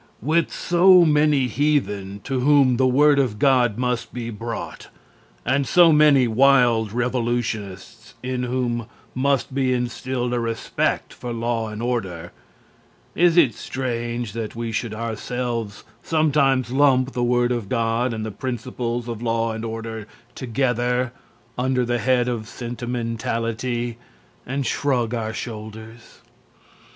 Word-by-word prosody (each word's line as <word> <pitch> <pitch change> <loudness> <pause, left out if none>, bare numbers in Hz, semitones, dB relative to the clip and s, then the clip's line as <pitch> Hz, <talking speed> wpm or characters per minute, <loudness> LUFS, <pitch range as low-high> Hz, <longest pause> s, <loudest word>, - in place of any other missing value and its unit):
With 160 +4 +1
so 180 0 +5
many 150 -3 +3
heathen 105 -8 -1
to 135 -1 -2
whom 135 -2 +4
the 130 0 +3
word 145 +3 +4
of 125 -6 0
God 125 -3 +3
must 125 -2 -2
be 115 -1 -4
brought 115 +2 -6 0.6
and 135 0 +1
so 170 +6 +6
many 150 -4 +5
wild 120 -3 +4
revolutionists 115 -3 -3
in 130 0 -2
whom 120 -2 -2 0.3
must 135 0 0
be 130 -1 +1
instilled 125 0 -2
a 120 - 0
respect 115 -1 -2
for 120 - -7
law 115 -1 -2
and 110 +2 -6
order, 95 -9 -3 0.8
is 175 0 +3
it 145 -9 +5
strange 120 -3 -4
that 115 -1 -5
we 115 0 -4
should 110 0 -3
ourselves 115 -1 -4 0.2
sometimes 140 -6 +2
lump 135 -1 +3
the 125 - -3
word 120 0 +2
of 120 -5 -3
God 115 +1 0
and 110 -1 -4
the 110 - -4
principles 120 +1 -4
of 115 -2 -5
law 115 -1 0
and 110 0 -5
order 110 -1 -5 0.3
together 125 0 -1 0.5
under 130 0 +1
the 120 0 0
head 125 +1 +2
of 115 -3 -3
"sentimentality" 120 0 -3 0.5
and 135 +2 -2
shrug 125 -5 0
our 110 -2 -2
shoulders? 110 0 -9
120 Hz, 130 wpm, -22 LUFS, 115-130 Hz, 0.8 s, so